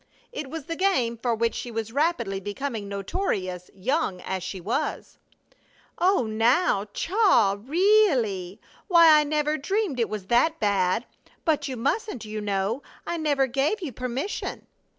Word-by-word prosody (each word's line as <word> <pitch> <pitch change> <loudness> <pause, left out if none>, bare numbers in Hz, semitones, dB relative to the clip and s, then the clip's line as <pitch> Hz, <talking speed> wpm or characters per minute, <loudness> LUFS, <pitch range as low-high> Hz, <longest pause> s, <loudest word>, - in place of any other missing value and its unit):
It 300 - -6
was 320 0 -6
the 330 +1 -4
game 325 -12 +1
for 235 0 -1
which 230 +1 0
she 245 - -5
was 225 -1 -4
rapidly 260 - 0
becoming 205 +1 -4
notorious, 195 - -3
young 200 - -1
as 190 -1 -3
she 185 +1 -5
was. 210 +8 -3 0.8
"Oh, 370 -6 +3
now, 225 - +2
Chaw! 340 - +3
Ree 395 - +4
ally! 195 - -2 0.3
Why, 335 -5 +7
I - - +3
never 300 +1 0
dreamed 385 - -1
it 230 - +1
was 210 -3 -5
that 275 +10 +2
bad! 200 +1 +1 0.4
But 300 -3 +1
you 260 -2 -5
mustn't, 275 - -2
you 215 0 -5
know! 205 +5 -1 0.2
I 340 - -2
never 290 -4 +2
gave 275 - 0
you 300 - -4
permission!" 255 - -4
250 Hz, 150 wpm, -25 LUFS, 210-320 Hz, 0.8 s, Why